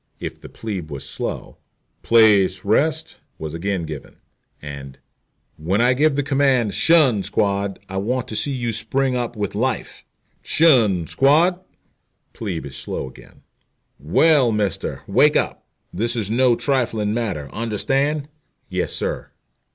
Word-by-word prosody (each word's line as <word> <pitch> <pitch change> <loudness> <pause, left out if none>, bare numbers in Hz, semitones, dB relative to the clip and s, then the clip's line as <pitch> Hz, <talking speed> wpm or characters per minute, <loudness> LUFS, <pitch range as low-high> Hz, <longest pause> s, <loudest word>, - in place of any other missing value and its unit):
If - - -7
the - - -11
plebe 95 -8 -6
was 70 -3 -6
slow, - - -5 0.4
"place, 100 -5 +4
rest" 155 +9 0 0.2
was 80 -1 -6
again 95 +1 -2
given, 75 -3 -8 0.4
and 70 -2 -9 0.6
"When 90 +7 -1
I 125 +2 +4
give 145 +2 +2
the 145 - 0
command 135 -5 +2
''tion, 145 -10 +4
squad,' 100 0 -1
I 95 - -5
want 125 +5 -1
to 110 - -5
see 140 +7 +1
you 120 -3 -2
spring 125 +4 -1
up 120 -1 -3
with 105 -1 -3
life." 125 +5 -2 0.4
"'Tion, 115 - +3
squad!" 160 - +3 0.7
Plebe 90 -10 -4
is 70 - -8
slow - - -4
again. 65 - -16 0.6
"Well, 125 - +4
mister, 105 -3 -2
wake - - +4
up. - - -2 0.3
This 120 +2 -1
is 110 -3 -1
no 125 +1 +4
trifling 115 -6 0
matter. 105 -11 -3
Understand?" 135 +7 -1 0.4
"Yes, - - -2
sir." - - -3
110 Hz, 135 wpm, -21 LUFS, 95-130 Hz, 0.7 s, place